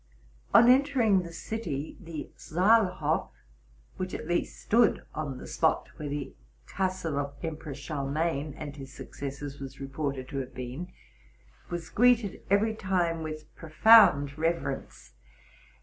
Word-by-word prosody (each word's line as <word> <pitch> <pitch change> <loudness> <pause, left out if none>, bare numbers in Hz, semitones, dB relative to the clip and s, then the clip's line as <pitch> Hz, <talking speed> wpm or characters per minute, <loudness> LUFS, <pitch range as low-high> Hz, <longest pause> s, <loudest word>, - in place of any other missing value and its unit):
On 235 - +7
entering 250 -7 +4
the 170 -1 -8
city, 165 -7 -4
the 165 -4 -7
Saalhof, 185 +3 +2 0.7
which 185 0 -3
at - - -6
least 175 - -1
stood 230 0 +3
on 145 -4 -4
the - - -9
spot - - +1
where 150 -1 -5
the 145 -1 -4 0.3
castle 185 -6 -2
of 140 0 -5
Basen 160 -3 -5
Charlemagne 145 +1 -2
and 145 -2 -7
his 135 -1 -9
successors 140 +2 -7
was 135 0 -8
reported 135 -1 -4
to 140 - -5
have 130 -1 -5
been, 130 +8 -6 0.8
was 175 -2 -5
greeted 235 -4 +3
every 210 +3 +3
time 180 -5 0
with 155 -1 -7
profound 155 -4 +5
reverence. 160 - -3
160 Hz, 130 wpm, -28 LUFS, 140-190 Hz, 0.8 s, On